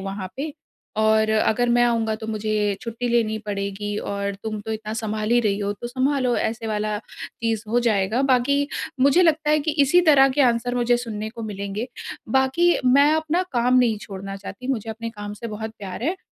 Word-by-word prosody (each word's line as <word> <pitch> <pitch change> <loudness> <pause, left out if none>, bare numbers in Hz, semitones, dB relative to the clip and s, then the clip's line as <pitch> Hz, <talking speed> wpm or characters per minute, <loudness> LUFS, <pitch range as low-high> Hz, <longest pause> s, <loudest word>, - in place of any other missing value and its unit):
वहाँ 195 -1 -5
पे 295 +3 -4 0.5
और 220 0 +3
अगर 220 +2 +2
मैं 240 0 +4
आऊँगा 230 -2 +1
तो 220 0 -7
मुझे 215 -1 0
छुट्टी 235 +1 -4
लेनी 230 -2 +1
पड़ेगी 205 0 -3
और 200 0 -3
तुम 220 -1 -3
तो 220 +1 -5
इतना 215 0 -5
सँभाल 220 -1 -3
ही 240 - +5
रही 205 -3 0
हो 205 0 -1
तो 205 +4 -7
सँभालो 255 0 +1
ऐसे 225 0 -2
वाला 210 -1 -1
चीज़ 225 -2 -4
हो 240 +2 +2
जाएगा। 215 0 +1
बाकी 275 +2 +2 0.3
मुझे 280 +7 +5
लगता 315 -2 +2
है 305 - +4
कि 310 - -1
इसी 300 +6 +5
तरह 275 -2 +7
के 265 +2 0
आंसर 245 0 +1
मुझे 245 0 +2
सुनने 220 -3 -4
को 230 0 -8
मिलेंगे। 205 +2 -4 0.4
बाकी 265 +8 +3
मैं 280 +4 +5
अपना 315 +3 +1
काम 250 +1 +3
नहीं 235 -3 +3
छोड़ना 195 -1 -7
चाहती। 200 +5 -9
मुझे 225 -4 -2
अपने 230 +1 -5
काम 205 -2 -7
से 230 - -7
बहुत 220 0 -5
प्यार 195 +1 -7
है 340 +8 0
225 Hz, 195 wpm, -23 LUFS, 210-255 Hz, 0.5 s, तरह